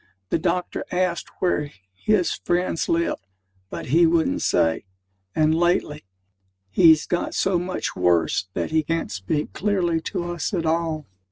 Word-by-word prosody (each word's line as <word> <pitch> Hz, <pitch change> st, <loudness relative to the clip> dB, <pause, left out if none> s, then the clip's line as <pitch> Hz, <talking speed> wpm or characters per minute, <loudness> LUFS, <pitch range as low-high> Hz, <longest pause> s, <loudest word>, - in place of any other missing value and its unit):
The -, -, +2 dB
doctor 180 Hz, +1 st, -1 dB
asked 180 Hz, -2 st, -1 dB
where 150 Hz, -5 st, 0 dB, 0.2 s
his 185 Hz, -, +1 dB
friends 175 Hz, -1 st, -1 dB
lived; 170 Hz, -8 st, 0 dB, 0.5 s
but -, -, -6 dB
he 165 Hz, +4 st, +5 dB
wouldn't 165 Hz, 0 st, +1 dB
say, 80 Hz, +4 st, +1 dB, 0.5 s
and, 155 Hz, 0 st, +3 dB
lately, 165 Hz, -, 0 dB, 0.7 s
he's 160 Hz, -4 st, +6 dB
got 175 Hz, -, -2 dB
so 190 Hz, -2 st, +2 dB
much 180 Hz, +1 st, -3 dB
worse 90 Hz, +1 st, +2 dB
that -, -, -2 dB
he 160 Hz, 0 st, +3 dB
can't 165 Hz, -6 st, -2 dB
speak 95 Hz, +11 st, -3 dB
clearly 180 Hz, -5 st, 0 dB
to 175 Hz, -, -2 dB
us 170 Hz, +4 st, -2 dB
at 170 Hz, -2 st, -1 dB
all. 160 Hz, -2 st, -1 dB
165 Hz, 145 wpm, -23 LUFS, 155-175 Hz, 0.7 s, he's